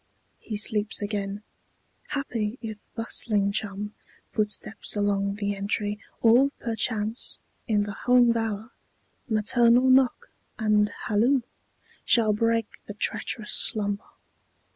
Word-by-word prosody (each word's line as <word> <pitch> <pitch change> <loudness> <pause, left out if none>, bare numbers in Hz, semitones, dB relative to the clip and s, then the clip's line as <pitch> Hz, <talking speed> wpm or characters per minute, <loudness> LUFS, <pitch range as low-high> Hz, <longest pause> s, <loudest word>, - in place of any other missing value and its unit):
He 215 - -6
sleeps 210 0 +3
again. 205 0 -4 0.6
Happy 240 -6 -3
if 220 -2 -7 0.2
bustling 215 -3 +1
chum, 205 0 -4 0.4
Footsteps 215 +1 -1
along 200 -1 0
the 205 -1 -2
entry, 205 +1 -2 0.2
or 240 +4 +5
perchance, 225 0 -2 0.3
In 210 -2 +2
the 205 - -5
home 245 +3 +3
bower, 225 0 -3 0.6
maternal 235 +3 +3
knock 265 - +2 0.3
and 210 -2 +2 0.2
halloo, 240 +6 +2 0.6
Shall 220 -3 +3
break 230 0 -1
the 205 - -7
treacherous 215 +1 -1
slumber. 205 -2 +3
215 Hz, 105 wpm, -26 LUFS, 205-230 Hz, 0.6 s, or